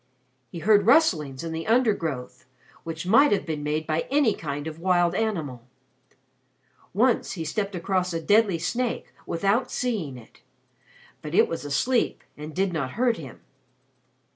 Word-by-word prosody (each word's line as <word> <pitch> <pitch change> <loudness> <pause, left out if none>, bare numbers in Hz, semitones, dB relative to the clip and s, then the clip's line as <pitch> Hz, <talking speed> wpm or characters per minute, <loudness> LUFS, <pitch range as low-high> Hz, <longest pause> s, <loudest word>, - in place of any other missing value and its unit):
He - - -7
heard 205 +3 +3
rustlings 155 - +3
in 165 - -4
the 160 0 -5
undergrowth, 200 - 0 0.4
which 165 +1 -6
might 255 +10 +5
have 205 - +1
been 155 -3 -3
made 150 +1 -2
by 155 +1 -1
any 275 -5 +3
kind 145 -1 -5
of 160 0 -6
wild 175 -1 +2
animal; 160 - -2 1.3
once 235 +5 +1
he 165 -4 -5
stepped 200 +5 -2
across 185 +1 -1
a 165 - -2
deadly 205 +1 +3
snake 235 +8 -3
without 200 +9 +1
seeing 200 - -2
it. 115 - -16 0.8
But 150 +2 -5
it - - +5
was 165 -3 -5
asleep 235 - 0
and 150 +1 -9
did 190 0 0
not 135 -5 -3
hurt 240 0 +1
him. 135 -7 -10
175 Hz, 150 wpm, -25 LUFS, 155-220 Hz, 1.3 s, might